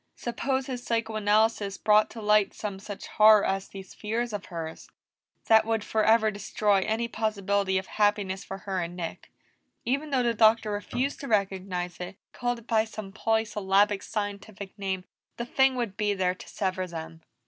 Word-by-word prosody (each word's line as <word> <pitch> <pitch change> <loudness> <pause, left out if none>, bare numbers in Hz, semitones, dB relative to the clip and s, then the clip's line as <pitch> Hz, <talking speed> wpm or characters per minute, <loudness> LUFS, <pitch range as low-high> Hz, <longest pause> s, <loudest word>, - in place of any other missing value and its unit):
Suppose 260 +2 -2
his 255 -2 -5
psychoanalysis 220 -3 +1
brought 210 0 +4
to 225 -1 -9
light 210 -1 +3
some 200 -2 -5
such 205 0 -8
horror 215 -1 +6
as 195 0 -1
these 195 -1 -10
fears 225 +2 -3
of 205 -1 -4
hers 165 -3 -7 0.6
that 220 0 +6
would 225 -1 -1
forever 220 0 +3
destroy 205 0 +1
any 220 +4 -1
possibility 200 -4 0
of 190 - -2
happiness 205 -2 0
for 195 - -6
her 195 -1 -3
and 170 +1 -5
Nick. 170 -2 -6 0.5
Even 280 +5 -1
though 265 -3 +2
the 235 -1 +2
Doctor 220 -1 +4
refused 245 +7 -2
to 280 - -6
recognize 190 -4 -1
it, 180 +2 -7 0.2
called 245 0 -1
it 235 - -14
by 220 -2 +3
some 215 -3 -8
polysyllabic 205 -2 +1
scientific 205 -2 -5
name, 190 -2 -2 0.3
the 235 - -3
thing 265 +1 +3
would 235 -6 -2
be 205 -1 +1
there 185 -1 +1
to 185 - -12
sever 185 -2 -2
them. 165 -1 -8
210 Hz, 170 wpm, -27 LUFS, 195-225 Hz, 0.6 s, horror